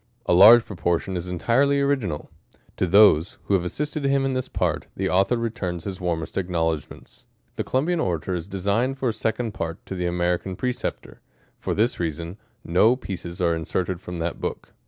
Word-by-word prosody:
A - - +2
large 110 +6 +9
proportion 90 0 -1
is 90 0 -4
entirely 125 +10 +2
original. 130 - -1 0.5
To 95 - +1
'Hhose, 95 -3 +5
who - - -1
have 95 -3 +3
assisted 150 - -3
him 140 0 +2
in 135 - 0
this 130 -1 -2
part, - - -1
the 95 - -1
author 95 +6 +3
re 115 -1 -1
^turns 90 -7 -4
his 95 -1 -5
zcarmest 85 -3 -3
acknowledgments. 85 -4 -3 0.3
The - - -2
COLUMBIAN 160 +7 0
ORATOR 90 - -1
is 85 -1 -4
designed 100 +7 0
for 130 -2 0
a - - -1
Second 110 +1 -2
Part 85 -4 -5
to - - -6
the 90 -1 -2
AMERICAN 90 +1 -1
PRECEPTOR: 125 +5 -4 0.4
fo^ - - -1
this 115 +4 +1
reason, 85 +2 -4 0.3
no 105 +8 +4
pieces 90 -7 -6
are 85 -1 +3
inserted 85 +2 -2
from 90 -1 -7
that 85 +1 -3
book. - - -5
95 Hz, 180 wpm, -24 LUFS, 85-120 Hz, 0.5 s, large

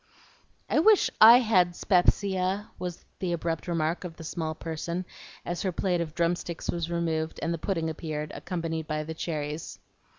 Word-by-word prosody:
"I - - +2
wish 420 +5 +5
I 230 +2 +11
had 185 -7 +3
'spepsia," 190 +1 +1
was 180 -1 -5
the 180 -2 -1
abrupt 165 0 -2
remark 165 0 0
of 170 -3 -7
the 165 - -9
small 160 -1 -3
person 170 +3 -4 0.4
as 175 0 -3
her 190 - 0
plate 180 0 0
of 155 -2 -5
drum 170 +1 +2
sticks 170 -1 -4
was 170 -1 -3
removed 160 -2 -1
and 165 +1 0
the 165 - -4
pudding 165 -3 -1
appeared, 155 -1 -4
accompanied 165 -3 -4
by 155 -1 -2
the 160 +1 -5
cherries. 155 -1 -4
170 Hz, 170 wpm, -28 LUFS, 160-180 Hz, 0.4 s, I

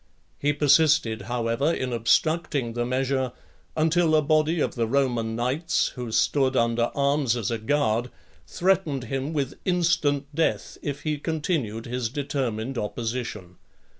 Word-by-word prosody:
He 145 - +2
persisted, 145 -6 +3
however, 120 +5 0
in 130 -6 -2
obstructing 140 +2 +1
the 120 0 -1
measure, 130 0 0 0.4
until 160 +1 +3
a 155 - +5
body 155 +2 +2
of - - 0
the 115 -2 -1
Roman 120 -3 0
knights, 130 +8 0
who 125 -3 -6
stood 135 +3 +2
under 115 0 +2
arms 140 -3 +1
as 115 -1 -2
a 115 - -2
guard, 120 -1 0 0.4
threatened 165 - +1
him 135 +4 -3
with 140 -4 -3
instant 165 -6 +1
death, 160 +2 -1
if 140 -1 -4
he 150 -2 -1
continued 145 - -2
his 120 -1 -2
determined 130 -3 -3
opposition. 110 -4 -4
135 Hz, 135 wpm, -25 LUFS, 115-150 Hz, 0.4 s, a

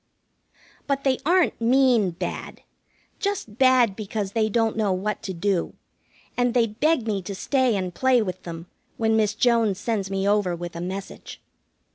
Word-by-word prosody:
But 275 -1 -1
they 265 -2 +1
aren't 355 -7 +2
mean 245 -4 +4
bad, 170 - -6 0.6
just 390 - -3
bad 255 -6 +4
because 205 -1 -4
they 220 0 +1
don't 225 0 +1
know 215 -3 +1
what 195 +3 -2
to 190 - -5
do, 185 0 -1 0.6
and 245 0 +1
they 240 -2 +4
beg 245 +5 0
me 205 -3 -1
to 195 +2 -6
stay 260 +2 +1
and 185 -2 -3
play 260 +4 +3
with 185 -4 -3
them 165 -1 -8 0.3
when 220 -1 +2
Miss 215 -1 +1
Jones 225 -5 +2
sends 205 -3 -2
me 195 0 -1
over 200 -4 +2
with 175 0 -7
a 170 - -5
message. 190 +2 -7
215 Hz, 165 wpm, -24 LUFS, 195-245 Hz, 0.6 s, mean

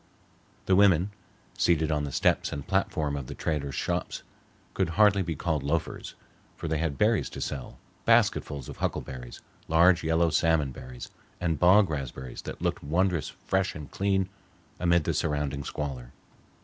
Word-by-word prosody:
The 95 - +4
women, 95 -1 +4 0.4
seated 80 -2 +2
on 75 -1 0
the 70 - -5
steps - - +1
and 70 -1 -5
platform 80 -6 0
of 70 -3 -5
the - - -7
traders' 70 -4 -2
shops, - - -2 0.5
could 95 -3 0
hardly 105 -2 +5
be 85 -3 -2
called 80 -1 -1
loafers, 75 +3 -3 0.4
for - - -5
they 80 -1 0
had 80 -4 -1
berries 110 -1 +2
to - - -8
sell, 65 -3 -5 0.3
basketfuls 70 -4 +2
of - - -8
huckleberries, 60 -2 -4 0.3
large 85 +2 +5
yellow 80 +1 +2
salmon 75 -2 +2
berries, 65 -1 -9 0.3
and 85 -3 -1
bog 95 0 +6
raspberries 65 -3 -5
that - - -7
looked - - -1
wondrous 85 +1 +1
fresh 95 0 -1
and 75 -2 -8
clean 95 -1 +1 0.5
amid 85 -2 +3
the - - 0
surrounding 75 -2 -1
squalor. 65 -5 -5
80 Hz, 155 wpm, -28 LUFS, 70-90 Hz, 0.5 s, bog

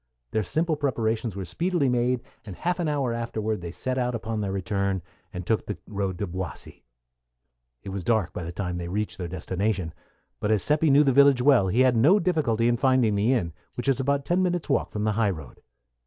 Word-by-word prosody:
Their 110 - +1
simple 160 - 0
preparations 115 -7 -1
were 95 -1 -4
speedily 170 - 0
made, 125 0 +1 0.2
and 100 -4 -8
half 180 - -1
an 170 - 0
hour 140 -5 0
afterward 110 -3 -3
they 85 - -5
set 130 +9 -3
out 125 -1 0
upon 110 -1 -3
their 100 -2 -2
return, 100 -1 -1 0.3
and 90 -3 -6
took 110 +2 0
the 105 - -4
road 100 -3 -3
to 100 - -2
Boissy. 90 -1 -7 1.0
It - - -7
was 95 -1 -4
dark 110 -6 +1
by - - -5
the 85 - -5
time 90 -1 -3
they 85 - -4
reached 105 +4 -3
their 90 - -3
destination; 95 0 -2 0.5
but 105 - -1
as 110 -3 +3
Seppi 150 +1 +3
knew 145 +2 +6
the 135 -3 +3
village 140 -2 +5
well, 130 -8 +5
he 110 +8 +2
had 130 -1 +4
no 145 - +5
difficulty 145 - +1
in 120 0 +2
finding 130 -4 +3
the 105 +4 +2
inn, 90 -11 0 0.2
which 120 - -4
was 135 -1 +2
about 140 +1 0
ten 175 +2 +1
minutes' 175 -3 -1
walk 140 - +1
from 105 - -3
the 110 - +2
high 105 0 +1
road. 80 -9 -7
115 Hz, 215 wpm, -26 LUFS, 95-135 Hz, 1.0 s, knew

